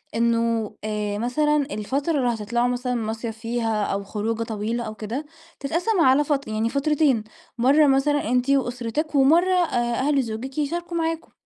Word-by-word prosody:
إنه 230 -1 +1
آآ، 210 -1 -2
مثلًا 295 +7 +1 0.2
الفترة 275 +10 -1
اللي 250 -3 +1
هتطلعوا 235 +2 -1
مثلًا 250 0 -1
مصيف 225 0 -4
فيها 225 -2 -1
أو 200 0 -2
خروجة 220 +3 -2
طويلة 225 +2 -3
أو 215 -1 -6
كده، 225 +8 -5 0.3
تتقسم 345 +8 0
على 265 0 +5
فت 280 -2 -1
يعني 220 +1 -1
فترتين، 280 -3 +2 0.3
مرة 280 +5 +5
مثلًا 275 -1 +2
أنتِ 250 +2 +1
وأسرتك، 265 +3 -1
ومرة 330 +7 +4
آآ، 245 -10 +1
أهل 280 +1 +2
زوجك 240 +3 -6
يشاركوا 340 +4 -2
معاكم، 330 0 -2
245 Hz, 150 wpm, -23 LUFS, 225-290 Hz, 0.3 s, على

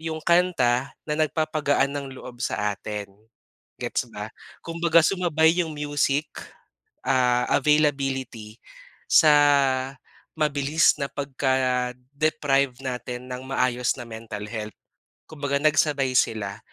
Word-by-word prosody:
'yong 160 -1 -5
kanta 150 -8 +2 0.2
na 150 - 0
nagpapagaan 155 -3 +1
ng 140 -1 -4
loob 125 -1 -11
sa 105 0 -1
atin, 105 -1 -6 0.7
gets - - -2
ba? - - -7 0.3
Kumbaga 170 0 +3
sumabay 165 -4 +3
'yong 160 -2 -5
music, 145 0 0 0.8
ah, 125 -2 +2
availability 135 -7 0 0.5
sa 155 -2 +6 1.0
mabilis 150 0 +2
na 140 - -1
pagka-deprive 130 +1 0
natin 125 -1 -5
nang 125 +1 -6
maayos 125 -2 0
na - - -5
mental 110 -2 -7
health. 110 -2 -6 0.5
Kumbaga 145 -2 -2
nagsabay 145 -3 +2
sila, 105 -4 0
135 Hz, 105 wpm, -24 LUFS, 125-155 Hz, 1.0 s, sa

